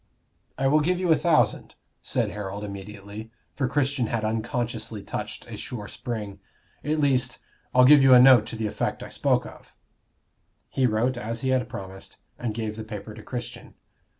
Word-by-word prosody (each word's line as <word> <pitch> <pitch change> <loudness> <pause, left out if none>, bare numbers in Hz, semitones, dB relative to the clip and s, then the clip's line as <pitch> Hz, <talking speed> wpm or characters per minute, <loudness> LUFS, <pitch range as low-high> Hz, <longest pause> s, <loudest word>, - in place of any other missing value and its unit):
"I 135 - -1
will 145 +3 +5
give 175 +4 +1
you 180 -2 +1
a - - +7
thousand," 150 -11 +1 0.3
said - - -1
Harold, 100 0 -5
immediately, 100 +2 -8 0.2
for 135 - -1
Christian 135 -2 0
had 110 -1 -1
unconsciously 115 -1 -2
touched - - -6
a - - -8
sure 105 -5 -6
spring. 105 -5 -5 0.4
"At 150 +2 0
least, 130 -4 +2 0.3
I'll 125 0 +6
give 145 +1 +8
you 135 -1 +8
a - - +9
note 125 -4 +7
to - - -6
the 110 0 -3
effect 105 - -2
I - - -8
spoke - - +1
of." - - -13 0.9
He 130 -1 +2
wrote 120 +3 0
as 115 0 -4
he 130 - -1
had 130 -3 +1
promised, 95 -4 -9 0.2
and 115 -3 -3
gave 110 -1 -3
the 110 - -5
paper 110 0 -7
to 110 - -10
Christian. 120 +2 -7
115 Hz, 180 wpm, -25 LUFS, 105-130 Hz, 0.9 s, a